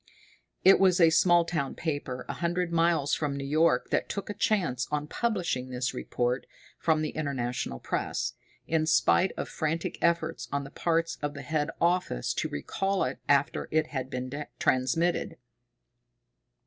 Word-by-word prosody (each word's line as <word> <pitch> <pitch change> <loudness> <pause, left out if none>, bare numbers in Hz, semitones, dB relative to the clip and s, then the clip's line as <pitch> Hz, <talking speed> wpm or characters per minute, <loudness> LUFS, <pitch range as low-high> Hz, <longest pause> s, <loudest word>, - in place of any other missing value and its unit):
It 190 - +8
was 185 -1 +4
a 165 -2 +6
small 175 +1 +5
town 150 -6 -2
paper 145 -6 -3
a - - -3
hundred 175 0 -1
miles 165 -3 +2
from 145 -2 0
New 140 - -4
York 155 +4 +2
that - - 0
took 200 0 -4
a - - -4
chance 175 - 0
on 150 0 -1
publishing 170 - -1
this 125 +1 -2
report 125 0 -2 0.3
from 155 -2 +2
the 155 - -2
International 125 - -3
Press, - - -2 0.3
in 160 -1 +1
spite 175 +3 +4
of - - -3
frantic 160 +1 -2
efforts 170 0 0
on 140 0 -1
the 140 - -10
parts 165 0 0
of 145 0 -3
the 140 - -7
head 150 +2 -1
office 170 - +1
to - - -2
recall 195 - -1
it 130 +1 -3
after 140 -1 +2
it 155 0 +1
had 130 -2 -3
been 130 +4 -4
transmitted. 165 +6 +1
155 Hz, 160 wpm, -28 LUFS, 135-170 Hz, 0.3 s, It